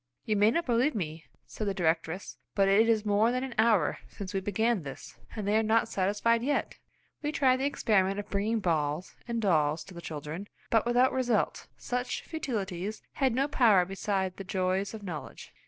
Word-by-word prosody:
"You 215 - +1
may 205 +1 +5
not 335 +8 0
believe 245 +4 +2
me," 160 -5 -4 0.2
said 215 - -5
the 195 - -1
directress, 165 +1 -1 0.2
"but 195 -1 +4
it 215 +4 +5
is 220 -2 +2
more 210 +3 +3
than 255 +1 -1
an 265 -2 -5
hour 220 -9 +3
since 195 -2 -7
we 195 - +1
began 210 +2 0
this, 140 -3 -9 0.2
and 210 -3 -4
they 205 - +2
are 220 - +4
not 225 +1 +2
satisfied 205 +4 +1
yet!" 285 +4 -1 0.4
We 295 - -1
tried 265 -4 +3
the 265 - -1
experiment 195 -8 +1
of 205 - -6
bringing 215 +3 0
balls, 155 -1 -1
and 235 -1 -1
dolls 160 -7 +2
to 190 - -13
the 170 - -8
children, 160 +4 -6 0.2
but 225 0 +3
without 245 +2 +4
result; 245 -4 0
such 250 0 -3
futilities 210 - -4
had 265 -4 +1
no 270 +2 +2
power 220 -11 +4
beside 190 0 -2
the 195 - -6
joys 190 +2 -1
of 215 - -9
knowledge. 165 -6 -7
205 Hz, 190 wpm, -29 LUFS, 185-235 Hz, 0.4 s, may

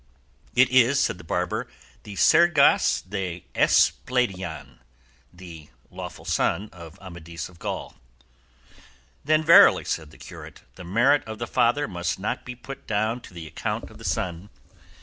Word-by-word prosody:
"It 130 0 +4
is," 130 +2 +4
said 95 - 0
the - - -11
barber, 90 +2 -2 0.3
"the 105 - -10
'Sergas 170 - +4
de 90 -3 -5
Esplandian,' 90 - 0 0.5
the 85 -4 -12 0.2
lawful - - -9
son 105 +2 -1
of 85 -3 -12
Amadis 85 -2 -8
of 85 -2 -19
Gaul." - - -5 1.3
"Then 155 +2 +2
verily," 165 +2 +7
said 80 -2 -3
the 80 - -17
curate, - - -12
"the - - -11
merit 120 +11 +2
of 110 0 -7
the 120 - -4
father 125 +5 +1
must 85 -1 -3
not 100 - -4
be 125 - -7
put 135 +3 -11
down 110 +3 -1
to - - -14
the 85 -2 -8
account 80 - -5
of - - -15
the - - -12
son. 90 +2 -3
95 Hz, 150 wpm, -24 LUFS, 85-125 Hz, 1.3 s, verily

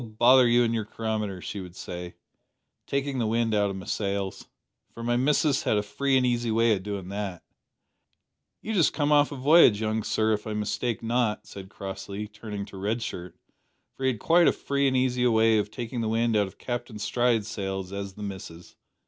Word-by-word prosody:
bother 120 +3 +5
you 120 +1 +4
an' 115 -1 0
your 110 -1 -1
chronometer,' 105 -3 -3
she 100 - -5
would 90 -2 -9
reply, 90 0 -7 0.7
takin' 140 -1 -1
the 115 - 0
wind 115 0 +1
out 105 -1 +2
o' - - -4
my 95 0 -7
sails 100 -2 -3 0.4
for 115 - -9
my 120 +1 +1
missus 140 +2 +2
has 105 - +1
a 105 - +1
free 135 +6 +1
an' 130 - +2
easy 120 -1 0
way 115 0 +3
o' 100 - -1
doin' 100 -1 -5
that 100 -3 -5 0.6
" - - -52
"You've 220 -1 -2
just 165 - +4
come 145 -1 0
off 145 0 +4
a - - -5
voyage, 135 -5 +6
young 110 0 -1
sir, 110 +1 +1
if 105 +1 -3
I 110 - -3
mistake 105 +3 -2
not," 115 -2 0
said 95 -1 -10
Crossley, 100 +1 -6
turning 105 -1 -7
to 100 - -11
Red 110 +4 -2
Shirt, 90 -5 -6 0.6
for 135 - -8
he 130 - +4
had 120 -5 -3
quite 170 +5 +4
as - - +3
free 140 0 0
and 130 -1 +2
easy 125 -1 +1
a 125 - +4
way 110 -1 +4
of 105 - -2
taking 120 +2 -5
the 110 - -1
wind 115 0 +1
out 105 -2 +3
of 95 - -13
Captain 120 -2 -5
Stride's 115 0 +1
sails 95 -3 -4
as 100 -1 -5
the 105 - -9
"missus." 95 -4 -8
110 Hz, 215 wpm, -26 LUFS, 100-120 Hz, 0.7 s, voyage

